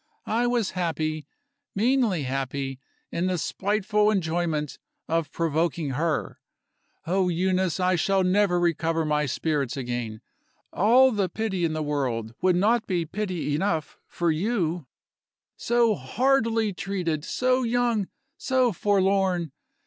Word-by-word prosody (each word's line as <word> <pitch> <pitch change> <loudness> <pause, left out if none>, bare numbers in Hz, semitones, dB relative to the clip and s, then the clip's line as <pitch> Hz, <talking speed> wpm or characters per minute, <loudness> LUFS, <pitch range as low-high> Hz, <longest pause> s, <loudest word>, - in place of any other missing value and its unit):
I 235 +3 +1
was 240 -5 0
happy, 155 -4 -2 0.5
meanly 225 - +2
happy, 135 0 -3 0.3
in 175 +2 -1
the 185 -1 0
spiteful 210 +4 +1
enjoyment 165 -6 -1 0.3
of 165 -2 -1
provoking 165 -2 -1
her. 155 +3 -2 0.7
Oh, 185 +2 +1
Euneece, 185 0 0
I 185 0 +2
shall 195 +2 +2
never 185 -1 +3
recover 165 -1 0
my 150 -1 +1
spirits 140 -1 -1
again! 120 -4 -4 0.5
All 250 +7 +5
the 200 -5 0
pity 190 -3 -1
in 160 - -1
the 155 0 -2
world 125 -7 -2
would 185 -1 +3
not 220 +5 +2
be 175 -4 0
pity 180 -4 -3
enough 160 -1 -1
for 170 -1 0
you. 170 - -1 0.7
So 235 -1 +2
hardly 225 - +1
treated! 175 -5 -2
so 255 +7 +1
young! 235 -4 +1 0.3
so 255 -3 +1
forlorn! 190 -4 +1
180 Hz, 125 wpm, -25 LUFS, 155-210 Hz, 0.7 s, All